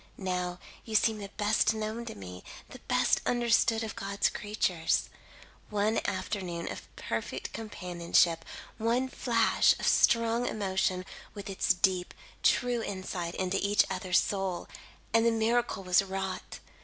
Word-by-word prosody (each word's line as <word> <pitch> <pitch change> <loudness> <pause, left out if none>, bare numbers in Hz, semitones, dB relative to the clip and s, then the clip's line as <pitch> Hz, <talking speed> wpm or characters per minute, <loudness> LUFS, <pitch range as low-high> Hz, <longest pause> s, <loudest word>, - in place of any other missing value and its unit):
Now, 180 -2 -2 0.3
you 220 - -5
seem 220 0 +3
the 200 -1 -7
best 215 +1 +3
known 220 +2 -3
to - - -7
me, 90 -2 -9 0.3
the - - -11
best - - +3
understood, 235 -2 +2
of 220 - -5
God's 200 +1 0
creatures. 190 -6 0 0.6
One 210 +1 +1
afternoon 185 -3 -3
of - - -8
perfect - - -4
companionship 175 -5 +1 0.4
one 240 +4 +1
flash 230 -3 +3
of - - -2
strong 230 +1 +3
emotion, 190 -3 0 0.3
with 200 -1 -6
its 190 - +1
deep, 180 0 +1 0.3
true 245 -1 +2
insight 185 -4 -4
into 185 +1 0
each 205 +1 +4
other's 185 -1 +1
soul, 190 -3 -1 0.5
and 225 0 +5
the 235 - +5
miracle 225 -2 +1
was 180 0 +4
wrought. 190 -1 -4
200 Hz, 135 wpm, -30 LUFS, 185-225 Hz, 0.6 s, and